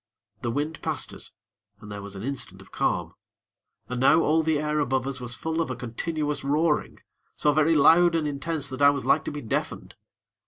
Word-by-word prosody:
The 120 - -2
wind 145 +6 -3
passed - - -2
us, - - -7 0.5
and 105 0 -11
there 100 0 -6
was 100 0 -9
an 95 - -7
instant 135 +1 -4
of - - -16
calm. - - -1 0.7
And 125 -1 -4
now 150 +5 +6
all 160 +1 +3
the 160 -1 +1
air 150 +1 -1
above 130 -3 0
us 135 -1 -4
was 120 -1 -3
full 160 +4 -2
of 160 - -2
a 130 - -3
continuous 150 +6 -3
roaring, 150 +2 +1 0.4
so 150 - +2
very 155 +2 +3
loud 165 +3 +6
and 160 -2 0
intense 145 +1 -2
that 130 +1 -6
I 140 - +8
was 140 -1 -1
like 155 - +3
to - - -3
be 145 0 -6
deafened. 110 - -3
145 Hz, 205 wpm, -26 LUFS, 130-155 Hz, 0.7 s, I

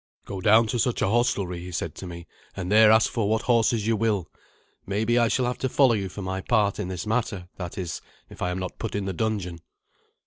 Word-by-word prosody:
"Go 95 -2 -6
down 110 +2 +5
to 120 +2 -2
such 125 0 +1
a - - +2
hostelry," 100 -6 0
he 90 +1 -8
said 80 -2 -3
to 95 - -8
me, 85 -1 -8 0.3
"and 95 0 -4
there 110 0 +7
ask 110 +1 +5
for 110 -4 -1
what 110 +1 +1
horses 115 -3 +2
you 115 0 +2
will. 105 -5 -1 0.5
Maybe 110 +5 +1
I 120 - +4
shall 125 +3 +1
have 125 0 -2
to 130 - -1
follow 130 -2 +4
you 100 -3 -2
for 100 +2 -7
my 95 +1 -3
part 105 -2 +1
in 100 - -2
this 90 +1 -5
matter 105 -5 -2
that 90 -2 -6
is, 90 -4 -4 0.3
if - - -14
I 90 - 0
am 90 - -3
not 90 -1 -5
put 115 - -4
in 100 -1 -2
the 95 - -2
dungeon." 95 -4 -2
105 Hz, 240 wpm, -25 LUFS, 90-115 Hz, 0.5 s, there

